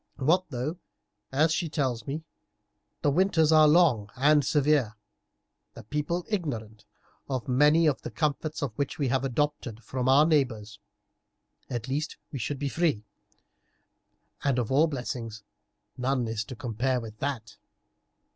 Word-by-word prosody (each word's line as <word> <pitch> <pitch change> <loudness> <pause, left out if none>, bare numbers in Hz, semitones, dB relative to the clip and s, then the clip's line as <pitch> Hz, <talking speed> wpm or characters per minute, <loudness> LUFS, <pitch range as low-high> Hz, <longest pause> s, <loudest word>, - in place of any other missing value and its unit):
What 165 +7 +2
though, 135 +8 -4 0.5
as 155 +4 +3
she 165 -1 -1
tells 130 -6 -2
me, 150 +4 -4 0.8
the 145 - +3
winters 165 -1 +3
are 155 -1 +7
long 150 -10 +4
and 145 +3 +4
severe, 145 -6 +2 0.8
the - - -10
people 150 - -2
ignorant 115 - -4 0.4
of 130 -3 -3
many 150 +6 +4
of 150 -4 +1
the - - -6
comforts 155 0 -2
which 140 0 -3
we 140 -4 0
have 130 +2 +1
adopted 130 -4 -2
from 125 +3 -2
our 140 +3 +6
neighbours; 120 -9 0 0.9
at 120 -1 -4
least 150 +5 -3
we 135 - -5
should 135 +5 -3
be 145 +1 -2
free, 145 -8 0 1.4
and 140 -3 +1
of 120 -2 -1
all 150 +5 +4
blessings 120 -6 -5 0.5
none 125 -1 0
is 110 -1 -2
to 130 - -8
compare 125 +2 -1
with 110 -2 -9
that." 135 -5 -4
135 Hz, 140 wpm, -27 LUFS, 120-150 Hz, 1.4 s, are